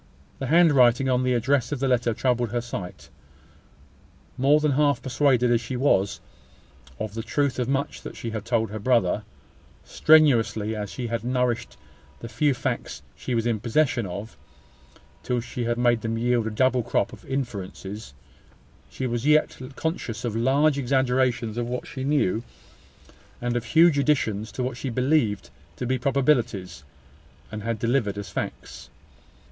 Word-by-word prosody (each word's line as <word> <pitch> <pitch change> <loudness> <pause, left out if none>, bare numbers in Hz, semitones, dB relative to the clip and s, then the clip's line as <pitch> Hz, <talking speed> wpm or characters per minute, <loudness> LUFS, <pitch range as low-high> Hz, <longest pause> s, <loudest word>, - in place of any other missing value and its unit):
The 135 - -3
handwriting 135 -5 +5
on 125 -1 +2
the 125 -1 +1
address 130 +3 +1
of 145 - -2
the 135 - 0
letter 125 -2 +2
troubled 120 -2 0
her 120 +2 -1
sight. 110 -7 -7 1.2
More 140 +4 +4
than 150 -1 +1
half 145 0 +2
persuaded, 125 -2 +2
as 120 -1 +3
she 125 +3 -5
was, 100 -7 +2 0.8
of 110 -1 -4
the 115 - -4
truth 140 +2 -1
of 125 0 -1
much 140 +1 -2
that - - -8
she 115 - -5
had 110 -2 -4
told 115 -2 0
her 110 - -5
brother, 110 -3 +1 0.6
strenuously 115 -8 +3
as 105 -1 -4
she 125 - -5
had 115 -1 -3
nourished 125 -1 -1 0.4
the 115 - -7
few 145 +3 +1
facts 120 - -4
she 120 - -3
was 115 0 0
in 115 -3 0
possession 120 -1 +1
of, 100 +5 -7 0.9
till 125 -1 -1
she 120 0 -5
had 120 0 0
made 120 -2 +2
them 115 0 -2
yield 120 -1 +1
a - - 0
double 130 +3 +2
crop 100 - -1
of - - -12
inferences, 105 - -5 0.7
she 130 - -5
was 120 +2 -2
yet 150 0 +3 0.2
conscious 125 - -3
of 115 -2 -2
large 140 +5 +2
exaggerations 125 -3 +1
of 120 - -2
what 125 +1 -4
she 130 - -6
knew, 135 -7 +1 1.0
and 120 0 -2
of 120 -1 -2
huge 160 +4 +5
additions 110 -8 0
to 130 - -3
what 125 -1 -3
she 135 - -4
believed 120 - 0 0.2
to 125 - -4
be 130 +1 0
probabilities, 120 - 0 0.7
and 110 0 -5
had 115 +1 -2
delivered 115 -3 0
as 100 - -6
facts. - - -6
120 Hz, 165 wpm, -25 LUFS, 115-135 Hz, 1.2 s, handwriting